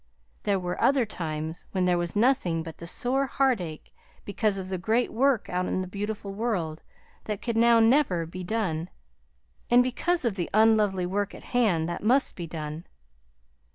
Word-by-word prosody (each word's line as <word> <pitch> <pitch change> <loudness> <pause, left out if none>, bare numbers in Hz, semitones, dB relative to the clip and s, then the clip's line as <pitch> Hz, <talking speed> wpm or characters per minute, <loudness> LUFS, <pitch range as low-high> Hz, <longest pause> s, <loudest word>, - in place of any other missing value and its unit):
There 200 -2 +1
were 180 -1 -4
other 265 -3 +4
times 160 -4 -5
when 185 -1 +1
there 180 -1 +2
was 175 +1 -3
nothing 205 -8 +2
but 165 -1 -9
the 170 - -8
sore 265 +8 0
heartache 215 - -1 0.3
because 205 0 0
of 185 -1 -5
the 185 -1 -3
great 225 +6 0
work 255 -1 +2
out 180 0 -1
in 185 - -1
the 185 - -4
beautiful 205 +1 -5
world 195 -8 -2 0.4
that 210 -2 -3
could 235 -2 -3
now 230 0 +5
never 225 - +3
be 180 +3 -7
done; 180 -5 -2 0.8
and 245 +1 +6
because 305 +6 -1
of 215 -4 0
the 175 - -2
unlovely 215 -4 +4
work 200 +2 -2
at - - -12
hand 195 -10 +2
that 175 - -4
must 255 +6 +2
be 170 -2 -6
done. 155 0 -6
200 Hz, 175 wpm, -27 LUFS, 175-235 Hz, 0.8 s, and